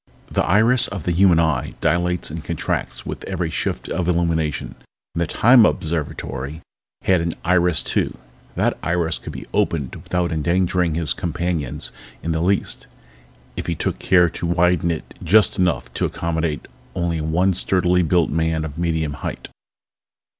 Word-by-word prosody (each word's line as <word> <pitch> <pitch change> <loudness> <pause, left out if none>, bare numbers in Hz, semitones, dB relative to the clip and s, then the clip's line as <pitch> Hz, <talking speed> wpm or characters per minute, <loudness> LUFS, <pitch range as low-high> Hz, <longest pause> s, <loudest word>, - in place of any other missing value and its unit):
The - - +1
iris 115 +6 +4
of 100 -6 -6
the 90 - 0
human 90 -1 +5
eye 80 -6 0
dilates 90 +1 0
and 80 0 -6
contracts 85 -2 -3
with - - -6
every 90 -4 -2
shift - - -2
of 90 - -2
illumination, 85 -3 0 0.4
and 85 - -2
the 85 - +1
Time 120 +6 +6
Observatory 80 -4 -2 0.4
had 95 -3 +3
an 85 0 -1
iris 90 -2 +3
too. - - -1 0.4
That - - 0
iris 85 -1 0
could 80 - -8
be 65 -3 -8
opened 75 -6 0
without 90 +1 -2
endangering 85 +1 +1
his 80 -5 0
companions 85 -4 -3 0.3
in 85 - -1
the 80 0 0
least 95 +3 0 0.7
if - - -5
he 85 - -1
took - - -2
care 90 -2 +4
to 85 +1 -4
widen 85 0 +2
it 80 -2 -4
just 100 +3 +4
enough 85 -9 0
to - - 0
accommodate 80 -2 -2 0.3
only 85 -2 -1
one 85 +5 +2
sturdily 90 0 +2
built 85 0 +2
man 80 0 0
of 75 0 -7
medium 80 -3 0
height. - - -5
85 Hz, 155 wpm, -21 LUFS, 80-90 Hz, 0.7 s, Time